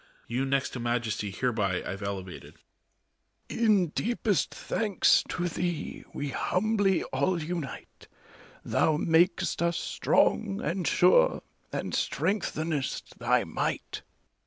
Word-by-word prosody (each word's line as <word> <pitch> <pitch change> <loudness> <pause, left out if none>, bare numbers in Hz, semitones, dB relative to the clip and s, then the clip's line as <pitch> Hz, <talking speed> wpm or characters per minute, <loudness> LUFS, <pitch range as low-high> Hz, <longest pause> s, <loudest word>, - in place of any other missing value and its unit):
You 125 +3 -1
next 135 0 0
to 125 - -6
Majesty 120 -3 -1
hereby 100 -3 -1
Pve 100 +2 -5
elevated. 95 -2 -6 0.9
ARCHBISHOP. - - -5
In 205 -5 +4
deepest 220 +1 0
thanks 210 -4 +2
to 175 0 -1
thee 175 -2 -3
we 145 0 -4
humbly 195 +5 +1
all 155 +7 +1
unite: 165 -2 -6 0.6
Thou 155 -2 +2
mak'st 175 +4 +2
us 170 0 +1
strong 100 0 +1
and 175 +3 -2
sure, - - +4 0.3
and - - -4
strengthenest 160 -7 -2
thy - - +2
might. - - -3
160 Hz, 110 wpm, -28 LUFS, 120-185 Hz, 0.9 s, In